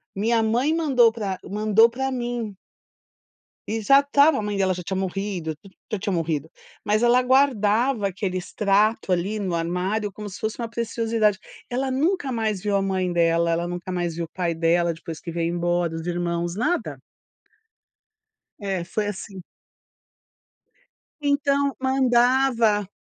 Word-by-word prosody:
minha 225 +3 +1
mãe 245 +8 +1
mandou 265 -8 +4
pra 200 -5 -4
mandou 215 +2 +3
pra 265 +3 -3
mim. 240 -4 -3 1.2
E 225 +1 -1
já 275 +7 +6
estava, 285 +1 +4
a - - -2
mãe 210 -1 -3
dela 190 -1 +2
já 180 0 -5
tinha 190 +2 -3
morrido, 190 -4 -3
tudo 190 +5 -18 0.2
já 215 - -1
tinha 200 +1 -2
morrido, 160 -3 -1 0.4
mas 215 +2 +1
ela 240 +1 +5
guardava 250 -3 +2
aquele 190 -1 -3
extrato 205 +3 +1
ali 190 +4 0
no 185 -4 -1
armário 185 +5 -1
como 210 +1 -7
se 185 - -9
fosse 220 0 -3
uma 230 - -3
preciosidade. 225 -2 0 0.3
Ela 260 +2 -2
nunca 290 +2 0
mais 220 -5 -1
viu 205 -1 +1
a 195 - +1
mãe 190 -2 -1
dela, 170 0 +2
ela 170 +1 0
nunca 175 +1 -5
mais 175 -2 -2
viu 170 +1 -3
o - - -10
pai 170 0 -2
dela 170 +1 +2
depois 165 -1 -8
que 170 - -7
veio 170 0 -1
embora, 175 -1 0
os 165 +1 -6
irmãos, 175 -1 -2
nada. 310 - -1 1.6
É, 195 -4 -3
foi 205 +4 -2
assim. 195 -2 -6 1.8
Então 280 -1 +1
mandava, 250 -4 +3
eh, - - -10
205 Hz, 155 wpm, -24 LUFS, 175-240 Hz, 1.8 s, já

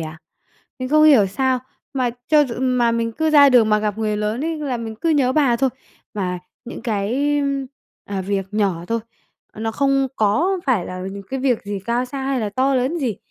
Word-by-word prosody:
à. 160 0 -7 0.6
Mình 255 - -4
không 305 +2 +5
hiểu 265 -10 +6
sao, 260 +6 0 0.3
mà 255 -3 0 0.2
cho 300 -1 +5
dù 245 -4 -5
mà 250 -2 +2
mình 230 0 -1
cứ 315 +6 0
ra 290 -2 +7
đường 245 -4 +5
mà 210 0 +3
gặp 210 0 -2
người 215 -1 -1
lớn 215 +6 -2
ấy 325 0 -2
là 280 -4 -2
mình 225 -1 -6
cứ 330 - -2
nhớ 270 -4 +3
bà 265 -5 +3
thôi. 265 +1 +1 0.4
Mà 180 -3 -2 0.3
những 240 - -8
cái, 240 +7 0
ưm, 275 -1 -1 0.4
à, 195 -1 -4
việc 195 0 -2
nhỏ 195 -5 0
thôi, 230 - 0 0.5
ờ, 215 - -10
nó 225 0 -2
không 275 +1 +2
có 310 - +2
phải 235 -10 +1
là 185 0 -6
những 200 0 -7
cái 265 0 -2
việc 255 -4 +1
gì 205 -1 -4
cao 240 +2 0
xa 270 +2 -6
hay 265 -1 -1
là 215 - -1
to 265 +5 +1
lớn 260 +7 0
gì. 245 - -2
245 Hz, 220 wpm, -21 LUFS, 210-275 Hz, 0.6 s, ra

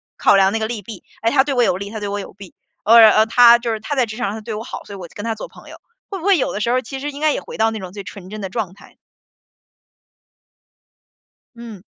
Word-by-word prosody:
考 200 - +4
量 195 0 +3
那 225 - 0
个 220 - -2
利 225 -2 -5
弊， 205 -1 -10 0.2
哎， 225 - +2
他 265 +2 +4
对 280 0 -2
我 245 - +2
有 205 - +2
利， 200 +2 -6
他 220 0 -6
对 205 - -4
我 205 0 -3
有 - - -10
弊， 195 -2 -14 0.3
呃， 220 -1 +7
他 235 +1 +6
就 235 -1 -2
是 215 - -5
他 280 +6 -4
在 255 - +3
职 220 -1 -8
场 240 -1 -2
上 205 - -4
他 - - -8
对 220 +1 -6
我 215 +1 -5
好， - - -8
所 200 - -9
以 195 - -10
我 175 - -9
就 - - -21
跟 205 - -7
他 225 -1 -2
做 - - -8
朋 - - -16
友， - - -10 0.3
会 390 - -5
不 330 - -11
会 400 -3 +4
有 - - -1
的 205 - -4
时 235 - 0
候 255 - +2
其 265 +2 -8
实 290 +1 -4
应 280 - -9
该 305 -1 +2
也 - - -3
回 - - -10
到 225 0 +3
那 220 - -5
种 185 -2 -8
最 200 +1 -8
纯 185 -2 -10
真 215 +1 -7
的 195 - -4
状 200 -4 -4
态？ 205 - -18 2.6
嗯。 230 -5 -10
220 Hz, 310 characters per minute, -19 LUFS, 205-240 Hz, 2.6 s, 呃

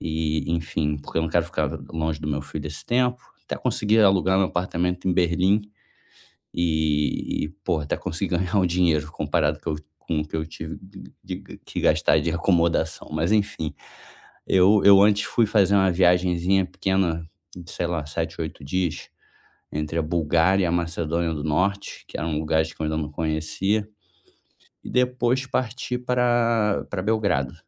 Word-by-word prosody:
E 80 -1 -1
enfim, 80 -2 -1
porque 70 - -4
eu - - +1
não 80 - -1
quero 85 -1 +2
ficar - - -1 0.2
longe 80 -1 -2
do 75 - -4
meu 75 -1 -1
filho 75 0 -6
esse 75 - -8
tempo, 125 0 +1 0.3
até - - -4
consegui 105 +1 +1
alugar 95 -2 +4
meu 95 - +3
apartamento 90 0 -1
em - - +3
Berlim. 90 +3 +2 0.9
E 80 -4 0
e - - -7 0.2
pô 80 - +1
até 75 -1 -2
consegui 85 +2 -2
ganhar 95 +3 -2
um 95 - +4
dinheiro 85 -3 +1
comparado 75 -1 0
com 80 - -2
o - - -3 0.2
com 80 - -2
o 75 - -6
que 75 - -5
eu 80 - -2
tive 80 0 -8
de 95 +1 -13 0.2
de - - -8
que - - -4
gastar 80 0 +3
de 85 - -1
acomodação, 85 -2 +1
mas 80 +4 0
enfim. 100 -7 0 0.7
Eu 95 +3 +5
eu 100 -1 +9
antes 100 0 +4
fui 115 - +2
fazer 100 -2 +3
uma 95 -1 +4
viagemzinha 90 +1 +3
pequena 95 -3 0 0.4
,sei 85 - -3
lá, 85 -4 -2
7, 75 - -4
8 - - -6
dias 90 +2 -2 0.6
entre 75 +2 -2
a 80 - +2
Bulgária 85 +4 +2
e - - +2
a 85 - 0
Macedônia 85 -1 -1
do 75 -1 -5
Norte, 95 +6 -1
que - - -6
eram 75 -1 -1
lugares 80 0 0
que - - -29
eu - - 0
ainda 80 0 -1
não 75 -1 -3
conhecia, 80 +7 -1 1.0
e - - -8
depois 125 +1 +1
partir 125 0 -2
para 120 -4 +1
para 100 - -3
Belgrado. 100 - 0
85 Hz, 170 wpm, -24 LUFS, 80-100 Hz, 1.0 s, eu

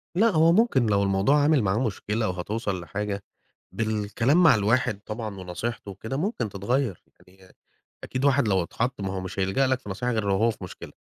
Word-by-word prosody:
لأ، 215 +6 +4
هو 165 -4 +4
ممكن 175 - +3
لو 100 -1 +2
الموضوع 100 +10 +3
عامل 150 -3 +4
معاه 100 +2 +1
مشكلة 110 -2 -1
وهتوصَل 100 +2 -3
لحاجة، 100 +3 -4 0.5
بالكلام 115 - +1
مع 165 - +7
الواحد 110 0 +1
طبعًا 110 -2 -5
ونصيحته 95 +4 -5
وكده 110 +7 -5
ممكن 160 - -2
تتغَير، 105 +1 -2 0.2
يعني 95 0 -20 0.5
أكيد 130 +2 -2
واحد 140 -4 +3
لو 95 -3 +2
اتحط 120 +7 -3
ما 95 -1 -3
هو 95 - -3
مش 95 +1 -6
هيلجأ 95 +9 +2
لك 130 -1 +1
في 105 - -11
نصيحة 125 +6 -2
غير 110 -2 0
لو 100 - +2
هو 115 +2 +3
في 110 - -11
مشكلة، 90 - -9
110 Hz, 190 wpm, -25 LUFS, 95-130 Hz, 0.5 s, مع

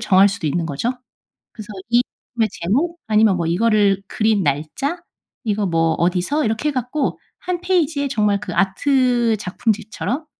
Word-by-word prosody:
정할 200 -2 +5
수도 195 -5 -4
있는 165 +3 -1
거죠. 165 - -2 0.6
그래서 215 -2 -9 0.2
이 240 +1 +5 0.3
작품의 225 -2 +2
제목 295 - 0
아니면 215 -3 +4
뭐 170 - -1
이거를 200 +1 +2
그린 215 -3 +1
날짜 155 - -2 0.4
이거 210 -2 0
뭐 165 -1 +2
어디서 180 - 0
이렇게 220 +7 0
해 295 - -3
갖고 255 +3 -2 0.2
1 360 -1 -3
페이지에 320 -6 +1
정말 210 -5 +1
그 175 - -5
아트 240 +4 +2
작품집처럼 220 - -2
215 Hz, 310 characters per minute, -20 LUFS, 190-260 Hz, 0.6 s, 정할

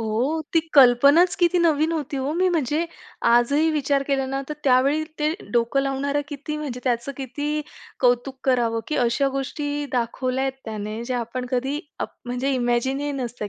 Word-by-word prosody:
ओह! 235 +9 0
ती 330 - +4
कल्पनाच 280 +6 +6
किती 350 0 +3
नवीन 320 -1 +2
होती 300 -3 -3
हो. 270 +3 -1
मी 370 +2 +2
म्हणजे 310 -1 0 0.5
आजही 280 +7 +4
विचार 285 -2 +1
केला 270 -1 +1
ना, 270 +1 -2
तर 300 - -3
त्यावेळी 275 +4 +3 0.2
ते 300 +1 +1 0.2
डोकं 240 +3 +2
लावणारं 280 +1 -1
किती, 295 +1 -5
म्हणजे 275 -5 -5
त्याचं 245 +2 -1
किती 290 +3 -3 0.4
कौतुक 250 +1 +2
करावं 235 -3 +2
की 305 - -1
अशा 245 +3 +2
गोष्टी 290 +2 -3
दाखवल्यात 255 +2 -1
त्याने, 215 0 -5
ज्या 250 0 -2
आपण 250 +2 -4
कधी 265 +3 -1 0.2
आप - - -3
म्हणजे 250 +2 -2
इमॅजिन 245 +2 0
ही 290 0 -2
नसत्या 245 -5 -4
270 Hz, 165 wpm, -23 LUFS, 245-295 Hz, 0.5 s, कल्पनाच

